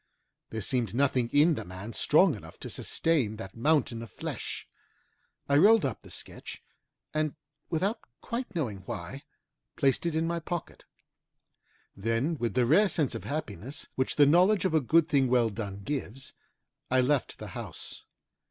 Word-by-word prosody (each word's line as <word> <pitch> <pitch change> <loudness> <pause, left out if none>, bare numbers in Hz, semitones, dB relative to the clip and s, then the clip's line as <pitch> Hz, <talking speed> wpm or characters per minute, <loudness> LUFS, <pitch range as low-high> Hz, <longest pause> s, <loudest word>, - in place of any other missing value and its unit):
There 110 - -4
seemed 115 -2 0
nothing 130 -3 +2
in 150 +5 +5
the - - -4
man 95 +5 -8
strong - - +4
enough - - -10
to - - -5
sustain 140 -10 +1
that 95 -3 -8
mountain 125 -2 +1
of 115 - -8
flesh. - - -5 0.8
I 140 - +3
rolled 210 +4 +6
up 130 -6 -3
the - - -14
sketch, - - -8 0.5
and 155 0 0 0.3
without 195 +7 0 0.2
quite 235 -4 -5
knowing 120 - -2
why, - - -6 0.5
placed 135 +4 +2
it 165 - -1
in 160 +1 +1
my 170 0 -1
pocket. 170 +1 -6 1.1
Then 115 +10 0
with 120 0 -1
the 125 -1 +4
rare 190 - +5
sense 155 -7 +1
of - - -6
happiness 135 - -5
which 130 - 0
the 145 - +7
knowledge 180 +7 +4
of 185 - +1
a 160 - +4
good 160 +5 +4
thing 140 -4 +3
well 120 -2 +3
done 100 -2 -5
gives, 135 0 -4 0.6
I 130 - +3
left 130 +1 +1
the - - -8
house. - - -7
140 Hz, 160 wpm, -29 LUFS, 115-160 Hz, 1.1 s, the